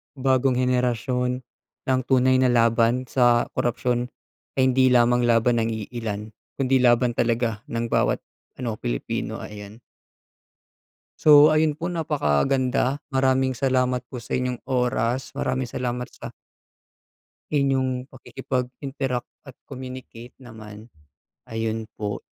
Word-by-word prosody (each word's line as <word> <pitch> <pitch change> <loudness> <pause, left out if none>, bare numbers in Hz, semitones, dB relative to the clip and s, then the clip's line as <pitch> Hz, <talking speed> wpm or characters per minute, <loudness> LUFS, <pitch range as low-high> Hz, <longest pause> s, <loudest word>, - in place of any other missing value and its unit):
bagong 130 -1 +2
henerasyon, 125 0 0 0.4
na - - -7
ang - - -5
tunay 130 0 +4
na 130 - +4
laban 115 +1 +3
sa 120 -2 +4
korapsiyon 120 +1 -1 0.5
ay 130 -1 +3
hindi 130 0 +4
lamang 120 -1 +4
laban 115 0 +3
ng 115 - 0
iilan 110 -1 -5 0.2
kundi 135 -1 +2
laban 120 0 +4
talaga 115 -2 0
ng 115 0 -3
bawat - - +1 0.3
ano, 115 -4 -4
Pilipino, - - -3
ayan. 105 +2 -10 1.4
So, 150 -1 +8
ayun 155 -1 +2
po, 170 - -2
napaka-ganda. 135 - 0
Maraming 130 -1 +1
salamat 125 -1 +1
po 125 - -5
sa - - -4
inyong 125 -1 -2
oras. 125 0 0
Maraming 130 0 -2
salamat 125 0 -4
sa - - -9 1.3
inyong 130 -2 0
pakikipag-interact 130 0 -4 0.2
at 135 - -11 0.2
communicate 130 -2 -9
naman, 110 -2 -11 0.6
ayun 115 0 -3
po. 105 -1 -4
125 Hz, 115 wpm, -24 LUFS, 115-130 Hz, 1.4 s, So